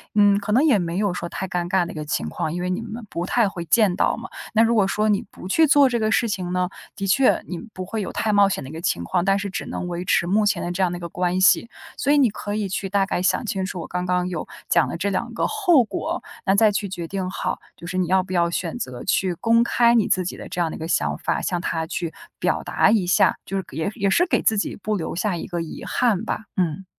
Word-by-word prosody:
嗯， 205 -1 +5
可 210 +1 -2
能 255 +6 +4
也 275 -10 +4
没 170 0 -2
有 200 -2 +1
说 175 - -4
太 190 +2 -5
尴 175 -1 -2
尬 180 0 +2
的 170 - -7
一 - - -10
个 155 -1 -5
情 75 - -2
况。 155 - -3
因 175 - -3
为 180 - -2
你 185 - -1
们 230 0 -7
不 170 - -3
太 225 +1 +2
会 175 -3 -6
见 195 +1 +3
到 - - +2
嘛， - - -8 0.2
那 225 0 +5
如 230 +1 +3
果 205 -4 +3
说 215 +2 +1
你 205 -2 +2
不 185 - -10
去 320 +10 +4
做 280 -1 +6
这 240 -1 0
个 215 -1 +1
事 230 +1 +2
情 180 -3 -3
呢？ 180 0 0 0.3
的 195 - -3
确 255 +7 +3
你 180 - -5 0.2
不 185 - -5
会 220 +3 -3
有 195 - -4
太 220 - 0
冒 205 -1 +6
险 190 -7 -2
的 130 - -8
一 - - -9
个 160 - -6
情 85 - -1
况， 170 - 0
但 195 0 +3
是 200 0 -3
只 185 - -4
能 180 - -4
维 175 0 -4
持 170 - +2
目 210 +4 +2
前 205 - +1
的 175 - -2
这 180 +2 -2
样 180 - +1
的 175 - -4
一 - - -10
个 170 - -5
关 180 +1 -1
系， 210 +4 +4 0.3
所 280 - +1
以 - - +4
你 270 -5 +5
可 205 0 -5
以 210 -2 -1
去 195 +1 -3
大 195 0 +2
概 185 - -2
想 185 - +1
清 190 -3 -2
楚 185 -2 -5
我 - - -7
刚 180 0 -3
刚 180 0 0
有 170 -4 -4 0.2
讲 170 - +4
的 - - -4
这 195 +4 -1
两 235 +5 -2
个 - - 0
后 365 - +4
果， 220 - -4 0.2
那 195 - +3
再 215 +1 +5
去 200 0 -2
决 175 -2 -5
定 190 0 -3
好， 185 - -3 0.2
就 170 - -10
是 185 - -3
你 185 -2 +1
要 185 +1 +3
不 185 - -7
要 170 -1 +2
选 170 -1 -3
择 125 -2 -6
去 185 -2 +1
公 230 +5 +3
开 235 0 +3
你 225 -4 +3
自 185 - +1
己 - - -4
的 - - -8
这 - - -5
样 165 - +1
的 - - -6
一 - - -12
个 160 - -4
想 - - 0
法， - - -1
向 175 - -1
他 165 -2 -2
去 165 -1 -4 0.2
表 - - 0
达 - - +2
一 205 -5 +2
下， 175 - +3
就 195 - -3
是 190 - -2
也 160 +3 -2
也 200 -4 +1
是 345 - +4
给 - - +1
自 220 - +2
己 205 - -1
不 215 +2 -2
留 170 -5 -3
下 190 +1 0
一 - - -6
个 175 -2 -3
遗 165 - -7
憾 225 -5 +1
吧， 220 - -3
嗯。 180 0 -1
190 Hz, 315 characters per minute, -23 LUFS, 175-215 Hz, 0.3 s, 做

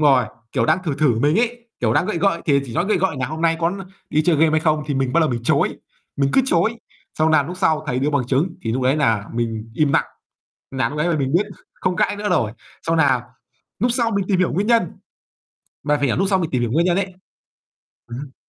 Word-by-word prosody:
rồi, 135 -4 +5 0.3
kiểu, 115 -4 +1
đang - - +3
thử 155 -5 -1
thử 135 -7 +2
mình 150 - +3
ấy, 240 0 -2
kiểu, 110 -3 +2
đang 175 - +2
gợi 215 -4 -2
gợi. 170 -1 +1
Thì 140 -3 +3
chỉ 120 - -8
nói 175 - +1
gợi 215 - +2
gợi 185 -4 0
là 130 - -1
"Hôm 155 +3 -6
nay 165 -1 +3
có 165 0 +2 0.4
đi 155 - +2
chơi 165 0 +2
game 160 +1 +4
hay 155 0 +2
không?" 155 -1 +1
thì 145 - -2
mình 135 -1 0
ban 170 - +3
đầu 155 -3 +2
mình 120 -1 -3
chối. - - +1 0.4
Mình 140 -1 +1
cứ - - +5
chối, 225 +1 +1 0.4
xong 155 +1 +3
nà 155 -2 +4
núc 175 +6 -7
sau 155 -3 +1
thầy 125 -4 -1
đưa 140 +3 0
bằng 140 -4 0
chứng, 135 +7 +1
thì 110 - -2
núc 130 +2 -1
đấy 130 +3 +2
nà 115 -9 +1
mình 115 -1 -3
im 150 -1 +2
nặng, - - +3 0.7
nà 130 -1 0
lúc 150 - -6
nấy 160 +3 +1
là 170 - +1
mình 135 -1 -1
biết 185 +6 +2 0.3
không 185 -1 -2
cãi - - +1
nữa 205 0 -3
rồi. 110 - +1 0.3
Xong 165 0 0
nà 135 -6 +3 0.6
núc 245 - +3
sau 235 -2 +1
mình 200 -3 0
tìm 195 -3 +2
hiểu 185 - +1
nguyên 200 +3 0
nhân, 230 0 +4 1.0
mà 150 +1 +1
phải 145 -1 0
lúc 195 - +1
sau 190 - +3
mình 170 -4 -2
tìm 125 -2 0
hiểu 120 - -1
nguyên 165 +5 +2
nhân 175 -1 +2
ấy 195 -1 -1 1.0
ừm 120 0 -7
hưm. 140 -2 -9
155 Hz, 260 wpm, -21 LUFS, 135-180 Hz, 1.0 s, rồi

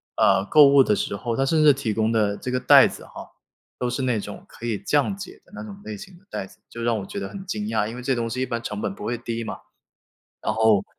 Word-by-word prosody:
呃， 95 - +3
购 150 +5 +7
物 140 -1 +7
的 105 - +2
时 100 - -2
候， 115 +3 -3
它 135 - +1
甚 155 +2 +2
至 150 -1 +7
提 130 -5 -3
供 110 +1 +1
的 105 -3 +1
这 - - -6
个 125 - 0
袋 125 - +7
子 - - -9
哈， - - -11 0.5
都 125 - -1
是 130 +2 -2
那 125 -4 +1
种 - - -8
可 - - -16
以 115 -3 -1
降 150 - 0
解 195 -1 -10
的 - - -25
那 220 - -7
种 210 -2 -9
类 215 -1 -6
型 195 -3 -12
的 - - -29
袋 - - -4
子， - - -19
就 115 - -8
让 115 -1 +1
我 95 - -6
觉 200 - -6
得 - - -4
很 195 -2 -8
惊 210 +3 -3
讶， 105 - 0
因 115 - -7
为 125 - -7
这 135 +2 0
东 115 -1 -2
西 125 +3 -4
一 - - +1
般 115 -2 -3
成 105 -3 -5
本 100 - -3
不 - - -10
会 120 +3 -2
低 115 0 -4
嘛， - - -5 0.8
然 - - -1
后 110 -3 +3
120 Hz, 305 characters per minute, -24 LUFS, 110-150 Hz, 0.8 s, 购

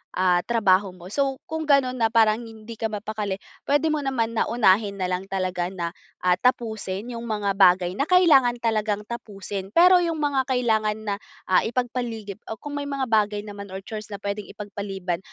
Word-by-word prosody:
ah, 180 -1 +3
trabaho 200 -5 +2
mo. 180 +1 -12
So 270 +1 0
kung 320 0 -3
gano'n 265 -3 +3
na 225 - +4
parang 220 -1 +4
hindi 225 0 -10
ka 225 - 0
mapakali 210 -1 -3 0.3
puwede 290 +3 +2
mo 305 - 0
naman 260 -5 -1
na - - +1
unahin 205 -3 +3
na 185 - -1
lang 185 +1 -2
talaga 185 -2 -1
na, 175 -3 -4 0.3
ah, 180 - +5
tapusin 220 -3 -1
'yong 230 - -5
mga 210 -3 0
bagay 180 -2 +5
na 280 +9 -1
kailangan 295 -10 +5
talagang 215 -2 0
tapusin. 200 -4 -6
Pero 360 +1 +8
'yong 335 -2 0
mga 285 -3 +1
kailangan 220 -4 +1
na, 200 - 0 0.3
ah, 185 - +4
ipagpaligip 230 -4 -3
o 220 - -3
kung 290 0 -7
may 285 - -4
mga 275 -1 -1
bagay 210 -1 +2
naman 200 -1 -8
or 190 - -5
chores 215 -2 -7
na 200 - -4
puwedeng 200 +1 -4
ipagpaliban, 195 -4 -4
215 Hz, 185 wpm, -24 LUFS, 195-250 Hz, 0.3 s, Pero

